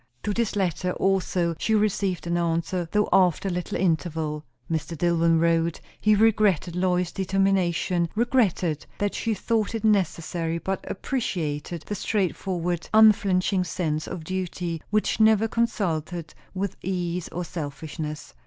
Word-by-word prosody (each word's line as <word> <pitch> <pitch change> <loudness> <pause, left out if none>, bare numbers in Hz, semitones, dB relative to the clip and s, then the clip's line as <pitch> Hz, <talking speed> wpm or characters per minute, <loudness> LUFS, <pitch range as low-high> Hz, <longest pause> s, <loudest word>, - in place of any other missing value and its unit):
To 210 - -1
this 230 -1 -1
letter 180 -2 0
also 180 -3 +1
she 220 - +1
received 200 -4 0
an 170 0 -1
answer, 170 0 -1
though 210 0 +2
after 185 +1 +3
a - - -2
little 180 0 -3
interval. 160 -3 -1 0.2
Mr. 160 0 -3
Dillwyn 165 0 +3
wrote, 165 0 +2 0.2
he 215 0 +4
regretted 205 -5 +3
Lois's 180 -1 +1
determination; 185 -3 +1
regretted 210 - +1
that 205 0 -1
she 225 -2 -1
thought 220 +2 0
it 225 - -3
necessary; 170 -5 +1
but 190 +3 -3
appreciated 170 - -3
the - - -4
straightforward, 180 -4 -1
unflinching 195 -3 +5
sense 155 -3 -2
of 170 - -6
duty 175 -2 -3
which 215 +1 +1
never 220 0 +5
consulted 175 -8 -2 0.2
with 195 0 -3
ease 180 -2 -2
or 180 +1 -4
selfishness. 155 -1 -6
180 Hz, 135 wpm, -25 LUFS, 165-200 Hz, 0.2 s, unflinching